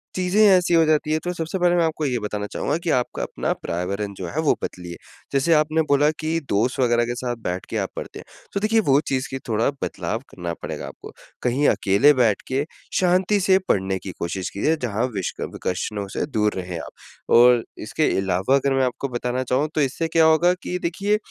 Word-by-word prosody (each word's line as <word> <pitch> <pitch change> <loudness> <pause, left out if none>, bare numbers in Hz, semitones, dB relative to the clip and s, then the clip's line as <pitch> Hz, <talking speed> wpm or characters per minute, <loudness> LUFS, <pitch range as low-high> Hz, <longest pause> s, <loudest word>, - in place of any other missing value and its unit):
चीज़ें 185 +3 +2
ऐसी 180 -3 +4
हो 165 - +6
जाती 155 0 +1
है। 155 - +2
तो 180 - -2
सबसे 165 +1 -3
पहले 175 0 +3
मैं 175 - +3
आपको 160 -1 -1
ये 125 -3 0
बताना 105 0 -3
चाहूँगा 145 +8 -2
कि 170 0 -4
आपका 125 - -3
अपना - - -3
पर्यावरण 100 +4 -4
जो 90 - -5
है 150 - -4
वो - - +6
बदलिए। 90 -1 -6 0.4
जैसे 140 +5 +3
आपने 155 +1 +3
बोला 145 +1 +4
कि 160 +1 -1
दोस्त 115 +6 +1
वग़ैरह 120 -1 +3
के 120 - -3
साथ 120 -1 -3
बैठ 90 +1 -3
के - - -2
आप - - -1
पढ़ते - - -7
हैं, - - -12 0.3
तो 200 - 0
देखिए 220 +2 +2
वो 135 +1 +6
चीज़ 130 -1 -1
की 135 - -4
थोड़ा 110 +2 +2
बदलाव 110 - -3
करना 85 -2 -5
पड़ेगा - - -5
आपको। - - -11 0.3
कहीं 130 +4 +2
अकेले 110 +10 +4
बैठ 120 -6 +2
के 135 +2 0 0.4
शांति 185 +3 +2
से 190 0 +4
पढ़ने 95 -1 +1
की 95 - -7
कोशिश 85 +2 -3
कीजिये 150 +11 0
जहाँ 115 0 0
विष 95 - -2
क - - -3
विकर्षणों 100 +2 -3
से - - 0
दूर 105 -7 0
रहे 90 -2 -4
आप। - - -8 0.5
और 120 -1 +6 0.2
इसके - - +1
अलावा 95 +6 +1
अगर 140 0 +1
मैं 135 - +2
आपको 125 +2 -3
बताना 125 +1 -2
चाहूँ 130 +4 +1
तो 155 - +2
इससे 140 +4 0
क्या 160 0 +4
होगा 165 +3 +4
कि 180 - -2
देखिए 200 +5 0
130 Hz, 215 wpm, -23 LUFS, 105-160 Hz, 0.5 s, हो